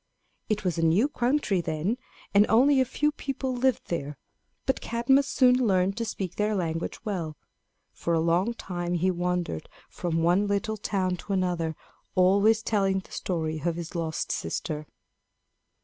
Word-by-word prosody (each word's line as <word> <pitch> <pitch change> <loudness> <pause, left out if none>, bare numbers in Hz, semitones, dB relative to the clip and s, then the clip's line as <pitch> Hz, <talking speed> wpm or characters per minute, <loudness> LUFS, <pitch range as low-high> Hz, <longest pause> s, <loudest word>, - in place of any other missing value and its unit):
It 215 -1 0
was 180 -3 -1
a - - +1
new 175 - +4
country 245 -8 +1
then, 170 +8 -2 0.3
and 205 +1 +6
only 265 +5 +5
a - - +3
few 295 +4 0
people 270 -3 -3
lived 255 0 0
there, 150 -4 -3 0.5
and 265 - +1
Cadmus 265 +4 +2
soon 250 -2 +4
learned 195 -6 +2
to 230 - -1
speak 195 -5 -4
their 210 0 +1
language 165 -3 -3
well. 170 -7 -3 0.6
For 170 - -1
a - - +2
long 175 +8 +1
time 175 -4 -3
he 185 +2 +2
wandered 175 - -2 0.2
from 165 -2 -1
one 180 +5 +3
little 205 +2 -1
town 185 -3 -1
to 200 - -5
another, 175 -4 0 0.4
always 200 +4 +4
telling 195 -3 +1
the - - -20
story 160 -3 -2
of 170 -1 0
his 170 -1 -6
lost 165 -2 -2
sister. 150 -1 -3
190 Hz, 160 wpm, -27 LUFS, 170-225 Hz, 0.6 s, and